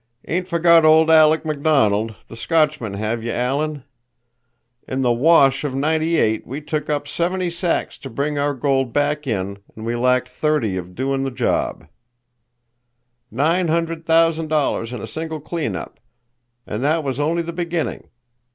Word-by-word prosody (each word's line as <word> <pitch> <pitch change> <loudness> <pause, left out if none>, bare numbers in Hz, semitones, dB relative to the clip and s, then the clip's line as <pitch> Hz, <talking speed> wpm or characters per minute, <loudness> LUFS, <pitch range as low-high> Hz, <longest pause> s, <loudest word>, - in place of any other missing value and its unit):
"Ain't 180 +3 -1
forgot 170 -1 +4
old 160 +1 +5
Aleck 160 0 +5
McDonald, 135 -9 +1
the - - -11
Scotchman, 150 -4 0
have 110 +3 -2
you, 115 +1 -3
Alan? 140 +4 -2 1.0
In 130 +1 -2
the 120 -1 +3
'wash' 135 0 +4
of 140 -3 -3
Ninety 160 +4 +1
eight 110 0 +1
we 135 +4 -5
took 150 0 -4
up 145 -1 -1
seventy 175 +4 -1
sacks 170 0 -2
to 135 - -8
bring 145 +4 -2
our 145 0 0
gold 135 -2 0
back 145 0 0
in 100 -3 -3 0.2
and 110 - -8
we 115 +1 -1
lacked 125 +1 +2
thirty 150 -11 -1
of 90 0 -6
doin' 135 +1 -1
the 135 - -1
job. 125 - -1 1.4
Nine 165 +8 +1
hundred 165 0 -1
thousand 165 -1 +2
dollars 145 -6 0
in 125 -4 -6
a - - -5
single 160 +7 -5
clean 160 +1 -3
up, - - -8 0.7
and 105 +4 -4
that 155 +3 +1
was 135 -1 -3
only 165 +3 0
the 170 +1 -6
beginning. 170 -2 -3
145 Hz, 160 wpm, -20 LUFS, 125-160 Hz, 1.4 s, old